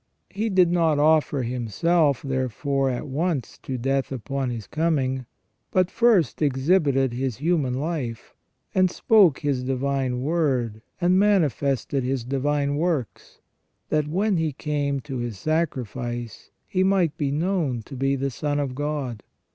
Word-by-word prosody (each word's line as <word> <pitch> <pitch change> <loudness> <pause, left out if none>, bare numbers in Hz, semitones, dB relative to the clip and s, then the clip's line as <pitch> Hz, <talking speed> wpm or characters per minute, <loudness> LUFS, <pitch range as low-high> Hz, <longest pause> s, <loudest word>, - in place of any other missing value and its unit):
He 215 +3 -1
did 185 -3 +4
not 165 -4 +2
offer 150 -2 +3
Himself, 135 - +1
therefore, 135 +1 -1
at 125 - -3
once 145 -1 -2
to 130 - -5
death, 135 +2 -1
upon 135 +1 -3
His 115 -4 -5
coming, 135 -6 -1 0.4
but 185 -1 +1
first 230 -11 +3
exhibited 140 -2 +2
His 130 -2 -2
human 150 -4 0
life, 135 - -4 0.4
and 185 -1 +4
spoke 190 -6 +4
His 140 -3 0
divine 130 -1 -1
word, 130 -8 0 0.2
and 180 +1 +3
manifested 145 - +1
His 130 -1 -1
divine 140 +2 0
works, 155 -7 -3 0.5
that 150 -1 +1
when 190 +5 +1
He 160 -2 0
came 145 -1 -2
to 135 -1 -6
His 120 -4 -4
sacrifice 120 - -3 0.2
He 185 0 +1
might 190 -5 +2
be 145 -2 -1
known 150 - -1
to 135 - -10
be 135 +1 +1
the 135 0 -2
Son 145 +3 -2
of 140 -3 -2
God. 140 -5 -3
140 Hz, 140 wpm, -24 LUFS, 130-165 Hz, 0.5 s, did